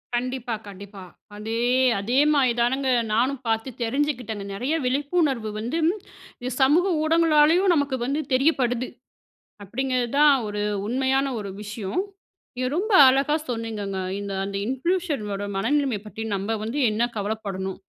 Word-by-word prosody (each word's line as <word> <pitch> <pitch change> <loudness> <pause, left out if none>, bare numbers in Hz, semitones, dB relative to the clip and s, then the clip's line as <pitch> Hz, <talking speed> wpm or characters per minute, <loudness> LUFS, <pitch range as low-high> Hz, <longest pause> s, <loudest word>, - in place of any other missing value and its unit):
கண்டிப்பா 250 0 -2
கண்டிப்பா. 200 0 -10 0.3
அதே 225 +2 -3 0.4
அதே 240 +6 -1 0.2
மாதிரி 260 -4 +3
தானங்க 265 +3 +1 0.2
நானும் 255 +4 +1
பாத்து 225 +3 0
தெரிஞ்சுக்கிட்டேனு 240 -5 -2
நிறைய 250 +10 -2
விழிப்புணர்வு 275 -3 0
வந்து 240 +9 -3 0.7
இ - - -1
சமூக 305 +8 +5 0.2
ஊடகங்களாலயும் 330 +3 +4
நமக்கு 285 -3 +1
வந்து 280 +4 -1
தெரியப்படுது, 255 -3 +2 0.8
அப்படிங்கிறதுதான் 260 +6 +2
ஒரு 205 0 -3 0.2
உண்மையான 265 +3 +1
ஒரு 200 -2 -5
விஷயம். 210 - -3 0.6
இத 255 - 0
ரொம்ப 420 +4 -1 0.2
அழகா 275 +3 +2
சொன்னீங்கங்க. 215 -5 -3 0.2
இந்த 200 -1 -5
அந்த 200 0 -4
இன்ஃப்லூயன்ஸர்ங்களோட 265 - -2
மனநிலைமய 260 +1 0
பத்தி 220 +1 -7
நம்ப 195 +2 -3
வந்து 245 +7 -2
என்ன 230 +3 0
கவலைப்படணும் 200 -2 -4
250 Hz, 120 wpm, -24 LUFS, 215-285 Hz, 0.8 s, சமூக